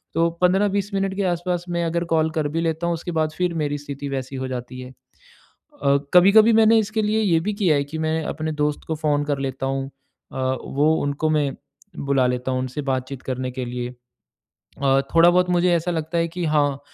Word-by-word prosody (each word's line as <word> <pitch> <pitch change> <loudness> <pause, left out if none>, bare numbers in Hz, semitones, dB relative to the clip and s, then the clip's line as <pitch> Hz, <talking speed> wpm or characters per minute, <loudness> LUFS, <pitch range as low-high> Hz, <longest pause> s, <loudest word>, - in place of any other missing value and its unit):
तो 165 +1 +3
15-20 200 +2 +2
मिनट 195 0 0
के 200 - -1
आस-पास 175 0 -2
मैं 170 0 -1
अगर 170 +1 -1
कॉल 160 0 +2
कर 155 -2 +1
भी 165 +3 -2
लेता 165 +1 -1
हूँ 170 - +1
उसके 170 +2 -6
बाद 155 -1 0
फिर 180 -1 0
मेरी 145 -2 -1
स्थिति 140 0 -6
वैसी 135 0 -4
हो 130 0 -3
जाती 125 0 -6
है। 125 - -9 0.9
अ, 140 0 +4 0.2
कभी-कभी 205 +5 +7
मैंने 225 0 +5
इसके 220 +1 -1
लिए 215 +1 +1
ये 175 -6 +3
भी 210 - 0
किया 185 -7 +2
है 140 - 0
कि 150 +3 -7
मैं 160 0 -1
अपने 155 +1 -3
दोस्त 150 0 -1
को 160 - -1
फ़ोन 150 -1 0
कर 145 -1 -1
लेता 135 -1 -3
हूँ 135 0 -2 0.5
अ, - - -6 0.3
वो 150 +3 +1
उनको 145 +2 -1
मैं 150 -3 +1 0.5
बुला 140 -2 +1
लेता 125 +1 -2
हूँ, 130 - 0
उनसे 130 +3 -4
बातचीत 130 -1 -3
करने 130 0 -3
के 125 0 -5
लिए। 120 0 -4 0.9
अ, 135 0 +4
थोड़ा-बहुत 175 +2 +5
मुझे 175 0 +3
ऐसा 170 +1 -1
लगता 160 0 -2
है 165 - +1
कि 175 +1 -4
हाँ, 145 -3 +1
155 Hz, 210 wpm, -22 LUFS, 135-175 Hz, 0.9 s, कभी-कभी